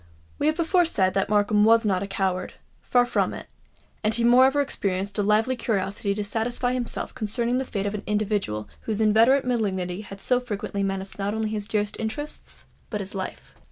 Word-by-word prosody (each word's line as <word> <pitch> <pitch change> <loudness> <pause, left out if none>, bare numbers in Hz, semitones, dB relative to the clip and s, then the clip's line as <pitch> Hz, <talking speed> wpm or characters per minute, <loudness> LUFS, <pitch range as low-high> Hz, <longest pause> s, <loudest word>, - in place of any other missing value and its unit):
We 295 - +1
have 310 - +2
before 345 +1 +3
said 190 - +2
that 195 - 0
Markham 210 0 +3
was 225 +1 +5
not 190 -3 +1
a 200 - -3
coward—far 195 +6 -1
from 245 - 0
it; - - -8 0.6
and 215 - +2
he 235 - 0
moreover 260 +4 +5
experienced 200 -7 -1
a - - +4
lively 215 +5 +2
curiosity 200 -3 -1
to 210 - -2
satisfy 240 +4 -1
himself 250 -2 -2
concerning 240 +2 0
the 265 - -2
fate 200 -5 -3
of 205 - -1
an 210 - -4
individual 205 - -1 0.2
whose 220 -1 -1
inveterate 225 +5 +4
malignity 195 -6 -1
had 195 -1 -10
so 250 +4 +2
frequently 205 -4 -4
menaced 195 0 -3
not 200 +2 -1
only 220 -1 -1
his 210 -1 -4
dearest 210 -2 -1
interests, 290 +7 -6 0.2
but 210 - -3
his 195 0 -6
life. 190 -2 -6
210 Hz, 190 wpm, -25 LUFS, 200-245 Hz, 0.6 s, was